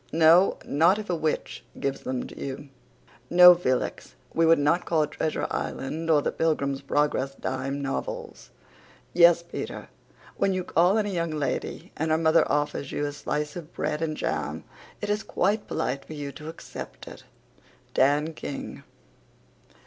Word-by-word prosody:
No, 165 +4 +5
not 165 +7 +3
if 210 -3 -4
a - - +1
witch 160 -1 -2 0.2
gives 135 0 -2
them 130 -1 -3
to - - -11
you. 140 +1 -6 0.6
No, 180 +1 +10
F 175 -3 -4
l 130 -1 +3
x, - - -8 0.2
we 165 0 +3
would 165 - +6
not 150 +5 +2
call 155 -2 +1
Treasure 155 +1 -2
Island 160 +5 -3
or 150 -3 +4
the - - 0
Pilgrim's 140 -4 0
Progress 140 -1 0
dime 135 +2 -3
novels. 475 - -5 0.6
Yes, 170 -1 +6
P 170 - -5
t - - -6
r, - - -9 0.5
when 195 - +2
you 185 -1 -1
call 180 +4 +3
on 215 - +1
a - - -2
young 170 -3 -1
lady 150 -4 -3
and 160 +1 -2
her 155 - +3
mother 160 0 +3
offers 145 -2 -1
you 145 - -1
a 145 - -2
slice 150 0 -3
of 170 -2 -8
bread 150 +1 -2
and 155 -2 -2
jam - - -3 0.4
it 210 - -3
is 210 +1 0
quite 205 +1 0
polite 135 +2 -2
for - - -9
you 145 -2 -5
to 150 +3 -9
accept 160 - -9
it. - - -11 0.7
DAN 145 +4 +2
KING. 145 -2 -7
155 Hz, 175 wpm, -26 LUFS, 145-170 Hz, 0.7 s, No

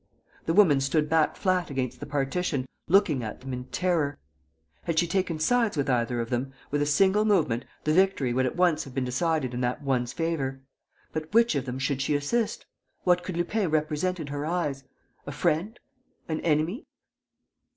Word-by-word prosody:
The 165 - +2
woman 165 -10 +6
stood 150 +3 +1
back 160 -1 +3
flat 185 -2 0
against 130 -3 -3
the - - -7
partition, 145 0 -1 0.2
looking 165 -7 +3
at 110 - -6
them 130 0 -6
in 125 0 -5
terror. 165 -4 0 0.7
Had 165 -1 -1
she 175 - +4
taken 185 -2 -1
sides 225 +3 +2
with 140 -1 +1
either 120 0 0
of 115 +1 -3
them, 130 +2 -2 0.2
with 145 0 +1
a 145 - +1
single 195 +7 +4
movement, 160 - +2 0.2
the 155 - +1
victory 180 -9 +2
would 130 +1 +2
at - - -4
once 175 -3 +2
have 135 -2 -11
been 130 -2 0
decided 130 0 0
in 120 - -3
that 125 +3 -1
one's 125 -3 0
favour. 140 -6 -2 0.5
But 155 0 -4
which 230 -2 +5
of 140 -3 -1
them 125 -1 -4
should 135 0 -1
she 145 +2 +1
assist? 210 +11 -1 0.4
What 180 -1 +3
could 180 -1 -5
Lupin 185 +2 0
represent 155 +4 0
in 155 - -4
her 145 0 -4
eyes? 150 -5 -2 0.4
A - - -3
friend? 190 +10 -1 0.5
An 160 -1 -2
enemy? 160 - 0
155 Hz, 185 wpm, -27 LUFS, 135-180 Hz, 0.7 s, woman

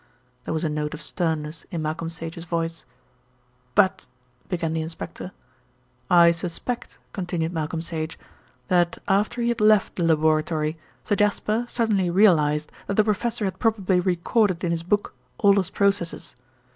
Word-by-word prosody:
There - - -2
was 160 - -1
a - - +1
note 150 0 -2
of 155 - -9
sternness 160 -2 -2
in 170 -4 -3
Malcolm 160 +2 -3
Sage's 165 0 -7
voice. 165 -1 -3 0.9
"But 190 -2 +3 0.2
" 125 0 -36
began 165 -3 -1
the 160 - -1
inspector. 160 +1 -7 0.8
"I 170 -1 +7
suspect," 175 +8 -4 0.2
continued 175 -3 -2
Malcolm 160 0 -2
Sage, 160 -1 -4 0.5
"that 175 -1 +2
after 210 +4 +1
he 235 - +2
had 235 -2 -1
left 215 -2 +4
the 175 - 0
laboratory, 155 -1 +2 0.3
Sir 205 - +1
Jasper 210 +3 +1
suddenly 210 -6 +1
realised 155 -6 +3 0.2
that 200 - -1
the 215 - +6
professor 215 +1 0
had 185 -1 -3
probably 200 -5 +2
recorded 185 +1 +1
in 170 - 0
his 165 -1 0
book 205 +5 0 0.2
all 200 -1 +5
his 190 -3 +1
processes. 200 -4 0
170 Hz, 155 wpm, -24 LUFS, 160-200 Hz, 0.9 s, I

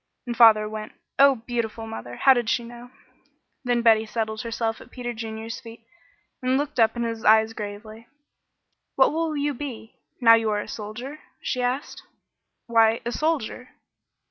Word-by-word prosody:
And 240 -1 -4
father 220 -2 +6
went. 215 0 -7 0.3
Oh, 275 -4 +5
beautiful 230 -2 -3
mother! 120 - -7
How 270 - +6
did 240 -3 -1
she 240 - +1
know! 240 +1 -11 0.7
Then 245 -2 0
Betty 220 -1 +4
settled 220 -1 -3
herself 230 -1 -3
at - - -14
Peter 240 -1 -5
Junior's 225 0 -6
feet 230 0 -13 0.6
and 255 +1 +1
looked 290 -2 -3
up 225 0 +4
in 235 - -2
his 230 -1 -4
eyes 220 +1 +5
gravely. 215 +2 -8 0.9
"What - - +4
will 320 -1 -1
you 290 0 0
be, 240 -4 -8 0.2
now 230 -3 +7
you 225 -1 +3
are 210 -1 0
a - - -6
soldier?" 240 +8 -7 0.2
she 255 - -2
asked. 250 +4 -2 0.6
"Why, 225 -1 +3
a 240 - -1
soldier." 275 -4 -2
230 Hz, 165 wpm, -24 LUFS, 220-245 Hz, 0.9 s, now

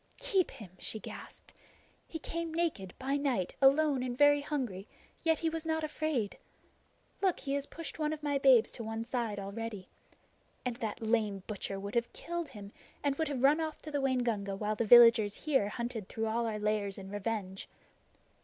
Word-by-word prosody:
"Keep 375 -3 +1
him!" 205 -7 -11
she - - -4
gasped. - - -10 0.5
"He 325 - -5
came 335 +1 -4
naked, 315 - -2
by 270 +2 0
night, 260 -11 0
alone 275 0 +5
and 250 -1 -3
very 290 0 +6
hungry; 245 -10 -3 0.3
yet 325 -1 +3
he 330 - -1
was 325 0 -2
not 320 -1 -1
afraid! 305 -8 -2 0.8
Look, 380 -3 +1
he 275 - -2
has 280 0 -1
pushed 325 -1 -7
one 305 -1 +1
of 310 -1 -5
my 285 -1 +1
babes 260 -4 +6
to 230 - -7
one 225 +1 -4
side 235 -4 -2
already. 200 0 -5 0.8
And 245 -2 -1
that 225 0 -4
lame 215 -4 +1
butcher 200 -2 -4
would 200 +1 -6
have 235 0 0
killed 345 -2 -4
him 205 -3 -10 0.3
and 285 -1 +1
would 320 - 0
have 270 -3 -3
run 295 +4 +5
off 315 -1 -3
to 305 - -7
the 285 -1 0
Waingunga 235 -7 0
while 210 +2 -1
the 230 - 0
villagers 230 -2 +8
here 270 -9 +1
hunted 235 -3 -4
through 225 - -2
all 230 +1 0
our 215 -1 -2
lairs 210 -2 -1
in 195 -1 -8
revenge! 205 -2 -4
240 Hz, 185 wpm, -32 LUFS, 210-290 Hz, 0.8 s, villagers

